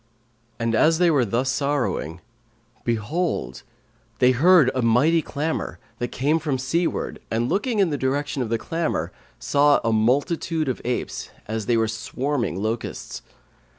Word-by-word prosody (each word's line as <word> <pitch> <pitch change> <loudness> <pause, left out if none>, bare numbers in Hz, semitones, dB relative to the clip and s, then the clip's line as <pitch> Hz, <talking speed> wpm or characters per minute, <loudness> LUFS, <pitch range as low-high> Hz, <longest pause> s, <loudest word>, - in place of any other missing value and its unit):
And 115 0 -1
as 160 +8 +4
they 175 -1 +4
were 135 -5 +3
thus 120 +5 0
sorrowing 130 - -1 0.6
behold, 120 +10 -2 0.6
they 125 +2 +5
heard 150 +1 +5
a 130 - 0
mighty 130 +9 +3
clamour, 155 +2 -3 0.2
that 120 - -1
came 145 +7 0
from 145 -4 -1
seaward 165 +7 -1
and 115 +2 0
looking 220 - 0
in 190 -5 +3
the 145 - -2
direction 140 +1 -1
of 120 - -2
the 115 - +1
clamour 135 - -2 0.3
saw 145 0 +3
a 115 -1 +1
multitude 145 +8 +1
of 130 - -2
apes, 125 +1 -3 0.2
as 110 -1 -3
they 120 - +3
were 110 0 +2
swarming 115 0 -2
locusts. 110 +3 -4
130 Hz, 150 wpm, -23 LUFS, 115-155 Hz, 0.6 s, they